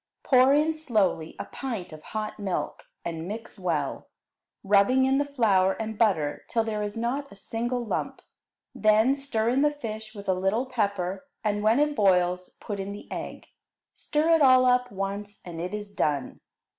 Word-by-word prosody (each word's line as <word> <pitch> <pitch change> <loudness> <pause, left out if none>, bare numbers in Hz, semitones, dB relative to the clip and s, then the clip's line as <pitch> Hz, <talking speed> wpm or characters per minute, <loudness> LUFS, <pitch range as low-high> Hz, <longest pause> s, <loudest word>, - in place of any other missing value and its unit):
Pour 255 0 +5
in 300 +3 +3
slowly 215 - 0
a - - -5
pint 220 - -5
of 155 - -10
hot 215 +5 -5
milk, 195 -3 -3 0.2
and 165 0 -4
mix 215 0 -7
well, 160 -7 -2 0.5
rubbing 205 +7 +4
in 270 +1 +3
the 285 - +1
flour 205 -9 +3
and 220 +1 -5
butter 160 -10 +1
till 230 - +1
there 215 -1 -2
is 210 +1 -4
not 265 +5 -2
a - - -12
single 235 +4 -3
lump. - - -3 0.5
Then 220 +5 +4
stir 235 -5 -1
in 260 +3 +2
the 295 - +5
fish 220 -6 -7
with 200 -1 -9
a 190 - +3
little 195 +7 0
pepper, 200 -2 -2 0.2
and 210 -1 0
when 220 +5 +3
it 295 0 +2
boils 180 -3 +2
put 205 -2 -5
in 195 +1 -4
the 205 - -10
egg. - - -6 0.5
Stir 305 +2 0
it 325 -1 +5
all 255 -2 +7
up 250 0 +3
once, 200 +1 -4
and 170 -2 -6
it 180 - -3
is 205 -1 -6
done. 145 -8 -1
215 Hz, 180 wpm, -27 LUFS, 195-255 Hz, 0.5 s, all